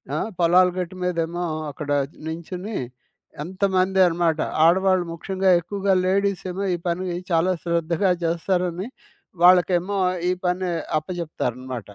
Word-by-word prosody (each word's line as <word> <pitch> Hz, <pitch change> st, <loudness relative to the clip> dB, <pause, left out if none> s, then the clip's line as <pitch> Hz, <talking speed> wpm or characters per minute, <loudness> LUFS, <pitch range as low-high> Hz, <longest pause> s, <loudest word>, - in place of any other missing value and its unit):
ఆ! -, -, 0 dB, 0.2 s
పొలాలు 180 Hz, +2 st, +5 dB
గట్టు 180 Hz, +1 st, -4 dB
మీదేమో 175 Hz, 0 st, -1 dB, 0.3 s
అక్కడ 145 Hz, +1 st, -8 dB, 0.4 s
నించొని 180 Hz, +6 st, -6 dB, 0.7 s
ఎంతమంది 190 Hz, +1 st, 0 dB
అనమాట, 165 Hz, -2 st, 0 dB, 0.3 s
ఆడవాళ్ళు 185 Hz, +1 st, +3 dB
ముఖ్యంగా 190 Hz, +3 st, -1 dB
ఎక్కువగా 195 Hz, +2 st, -1 dB
లేడీస్ 200 Hz, 0 st, +1 dB
ఏమో 195 Hz, +2 st, -4 dB
ఈ -, -, -4 dB
పని 180 Hz, +2 st, -1 dB, 0.2 s
చాలా 170 Hz, +3 st, +3 dB
శ్రద్ధగా 170 Hz, +2 st, +1 dB
చేస్తారని, 180 Hz, +3 st, -1 dB, 0.6 s
వాళ్ళకేమో 180 Hz, +2 st, +4 dB, 0.3 s
ఈ -, -, +3 dB
పని 180 Hz, +1 st, 0 dB, 0.3 s
అప్పచెప్తారనమాట. 130 Hz, -, -5 dB
180 Hz, 110 wpm, -23 LUFS, 165-190 Hz, 0.7 s, పొలాలు